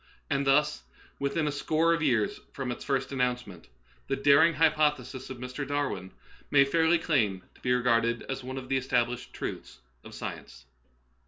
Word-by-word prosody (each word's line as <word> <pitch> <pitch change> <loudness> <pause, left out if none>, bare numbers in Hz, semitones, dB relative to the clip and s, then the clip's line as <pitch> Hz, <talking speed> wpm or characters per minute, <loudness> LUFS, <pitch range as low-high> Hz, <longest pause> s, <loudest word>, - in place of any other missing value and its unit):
And 140 0 +1
thus, 150 +2 +3 0.4
within 140 +3 0
a - - 0
score 160 +3 +2
of 165 - -1
years 120 -8 +1
from 130 -3 -3
its 120 - -6
first 135 -1 -1
announcement, 125 -9 -2 0.4
the - - 0
daring 145 +4 +5
hypothesis 150 -5 +1
of 130 - -6
Mr. 125 +3 -5
Darwin 140 -10 -2 0.4
may 140 -1 +6
fairly 165 +4 +3
claim 110 - 0
to - - -23
be 125 - 0
regarded 120 -1 +2
as 135 0 -5
one 130 +1 -6
of 130 -1 -6
the 135 - +1
established 125 -2 -1
truths - - -6 0.3
of - - -11
science. - - -8
135 Hz, 165 wpm, -28 LUFS, 125-145 Hz, 0.4 s, may